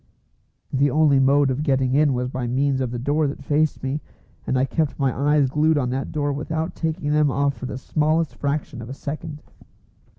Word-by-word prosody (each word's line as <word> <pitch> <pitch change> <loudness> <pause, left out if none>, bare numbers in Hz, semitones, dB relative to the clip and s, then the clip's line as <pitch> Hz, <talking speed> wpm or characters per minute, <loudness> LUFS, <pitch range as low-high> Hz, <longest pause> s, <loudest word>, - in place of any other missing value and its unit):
The 140 +2 +3
only 145 -1 +4
mode 140 +1 +4
of 130 +3 -2
getting 135 -4 +1
in 145 0 +4
was 125 0 -1
by 125 -1 -3
means 135 +2 +1
of 130 - -1
the 120 - -4
door 145 +5 +1
that 140 0 -6
faced 150 +1 0
me, 135 +3 -2 0.5
and 130 - +1
I 130 - +3
kept 155 0 -1
my 135 -3 0
eyes 145 +1 +3
glued 150 +3 +2
on 125 -3 0
that 130 +1 -3
door 145 -2 -1
without 160 +3 -3
taking 160 -2 -2
them 150 -1 +3
off 140 +1 +1
for 130 - -7
the 130 - -5
smallest 155 +3 0
fraction 140 -4 -3
of 115 - -8
a 135 - -6
second. 150 +1 -6
140 Hz, 205 wpm, -23 LUFS, 130-150 Hz, 0.5 s, only